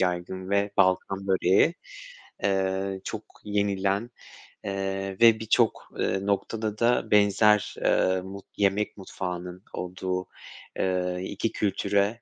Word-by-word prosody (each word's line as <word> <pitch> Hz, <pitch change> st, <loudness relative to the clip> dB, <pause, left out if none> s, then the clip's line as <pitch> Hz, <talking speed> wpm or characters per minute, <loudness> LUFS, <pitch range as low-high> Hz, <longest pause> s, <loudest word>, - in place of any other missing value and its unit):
yaygın 95 Hz, +1 st, -2 dB
ve 100 Hz, 0 st, +2 dB
Balkan 95 Hz, +1 st, +2 dB
böreği, 95 Hz, -, +3 dB, 0.7 s
eee, 95 Hz, 0 st, 0 dB
çok -, -, -5 dB, 0.2 s
yenilen, 100 Hz, +2 st, 0 dB, 0.5 s
eee, 95 Hz, -1 st, -3 dB
ve 115 Hz, -1 st, +7 dB
birçok, 110 Hz, +1 st, +1 dB
eee, -, -, +1 dB
noktada 105 Hz, +1 st, -1 dB
da 120 Hz, +1 st, +2 dB
benzer, 105 Hz, 0 st, +4 dB
eee, 95 Hz, 0 st, +2 dB
mut 95 Hz, +1 st, -9 dB
yemek 100 Hz, +1 st, +1 dB
mutfağının 90 Hz, -1 st, -6 dB
olduğu, 90 Hz, 0 st, -3 dB, 0.5 s
eee, 90 Hz, -1 st, 0 dB
2 115 Hz, -, -2 dB
kültüre, 100 Hz, +2 st, 0 dB
95 Hz, 110 wpm, -26 LUFS, 95-105 Hz, 0.7 s, ve